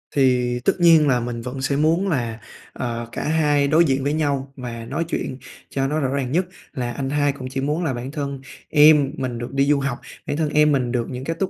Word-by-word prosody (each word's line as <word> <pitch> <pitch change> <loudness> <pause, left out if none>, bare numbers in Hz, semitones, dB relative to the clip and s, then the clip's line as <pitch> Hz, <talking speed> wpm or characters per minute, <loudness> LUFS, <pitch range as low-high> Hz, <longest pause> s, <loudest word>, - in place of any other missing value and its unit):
Thì 125 -3 +2
tất - - +4
nhiên 165 -3 +6
là 125 -3 +3
mình 120 -1 -4
vẫn 125 +2 -6
sẽ 140 +1 0
muốn 160 +6 +2
là, 120 -8 -2 0.3
ờ, 120 -1 -4
cả - - -4
hai 150 -2 +2
đối 160 +3 +4
diện 135 -1 0
với 145 - 0
nhau 140 -3 -1
và 120 -3 -6
nói 150 +7 -2
chuyện 130 -6 -3 0.3
cho 135 0 -1
nó 155 +2 -1
rõ 135 - 0
ràng 135 -2 -2
nhất, 180 +4 +2 0.3
là 120 -2 -3
anh 135 -1 -3
hai 145 0 +2
cũng 130 -2 -7
chỉ 135 0 -3
muốn 150 +5 -1
là 145 -6 0
bản 125 +3 -5
thân 140 -3 -4 0.3
em 150 -2 +6
mình 125 -3 -3
được 120 +1 -6
đi 140 0 +2
du 145 0 +3
học, 135 -3 -2 0.3
bản 145 - -2
thân 155 -2 0
em 150 0 +4
mình 125 -4 +1
được 120 -2 -1
những 125 0 -6
cái 165 +3 -2
tốt 190 -1 0
140 Hz, 245 wpm, -22 LUFS, 125-150 Hz, 0.3 s, nhiên